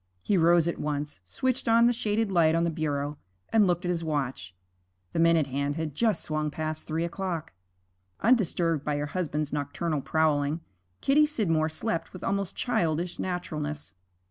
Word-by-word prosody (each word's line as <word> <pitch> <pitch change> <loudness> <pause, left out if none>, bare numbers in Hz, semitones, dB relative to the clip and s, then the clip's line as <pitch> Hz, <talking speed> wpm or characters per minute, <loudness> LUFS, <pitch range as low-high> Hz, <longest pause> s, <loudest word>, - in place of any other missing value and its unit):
He 205 - +2
rose 170 -1 +5
at 170 - -2
once, 145 -7 -3
switched 255 - -1
on 230 +1 +6
the 240 - +4
shaded 220 -2 0
light 165 -3 +4
on 165 - +2
the 170 - +1
bureau, 145 -2 -2 0.3
and 215 -3 +4
looked 175 +1 0
at - - 0
his 170 -1 -2
watch: 135 - -3 0.6
the - - 0
minute 165 -2 +4
hand 140 +2 -2
had 160 -2 -3
just 215 +2 +1
swung 155 -1 -1
past 155 +1 -3
three 160 +1 -1
o'clock. 170 -2 -4 0.7
Undisturbed 175 - +2
by 150 -1 -1
her 145 - -1
husband's 150 -3 -2
nocturnal 150 +1 -2
prowling, 155 +1 +1 0.4
Kitty 300 +2 +4
Scidmore 165 - +1
slept 165 +3 -3
with 185 - -9
almost 200 -1 -1
childish 170 -6 -1
naturalness. 155 - -4
165 Hz, 165 wpm, -28 LUFS, 150-185 Hz, 0.7 s, on